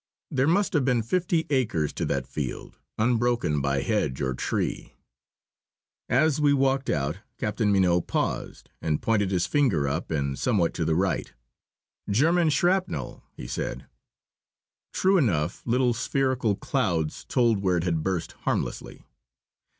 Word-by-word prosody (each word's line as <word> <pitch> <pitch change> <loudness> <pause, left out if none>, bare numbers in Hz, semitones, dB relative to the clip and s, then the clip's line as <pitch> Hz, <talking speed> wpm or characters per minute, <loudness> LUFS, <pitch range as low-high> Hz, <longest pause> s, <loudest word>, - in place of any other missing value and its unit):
There 135 +1 +2
must 190 +4 +2
have 150 -5 +2
been 125 -3 +1
fifty 170 +5 0
acres 110 - 0
to - - -2
that - - -1
field, - - -6 0.2
unbroken 120 - +1
by 70 0 0
hedge 65 - 0
or 65 -2 -1
tree. - - -3 1.1
As 150 +3 +3
we 145 -1 +4
walked 135 -1 +1
out, 75 +4 -1 0.2
Captain 105 -1 0
Mignot 90 -3 +2
paused - - -3
and 75 -2 0
pointed 105 -4 +1
his 90 -2 +1
finger 90 - +2
up 75 +6 -2
and 70 -3 -2
somewhat 100 -9 +1
to 85 - -2
the 80 0 +1
right. 95 +2 0 0.8
"German 160 - +3
shrapnel!" 180 +6 0 0.2
he - - -7
said. - - -4 1.1
True 190 0 +3
enough, 90 - 0
little 125 +1 +2
spherical 125 -3 0
clouds 80 -5 -1
told 115 -4 +2
where 90 -2 +2
it 85 - -1
had 85 -3 0
burst 90 -1 -2
harmlessly. - - -4
110 Hz, 140 wpm, -26 LUFS, 85-135 Hz, 1.1 s, we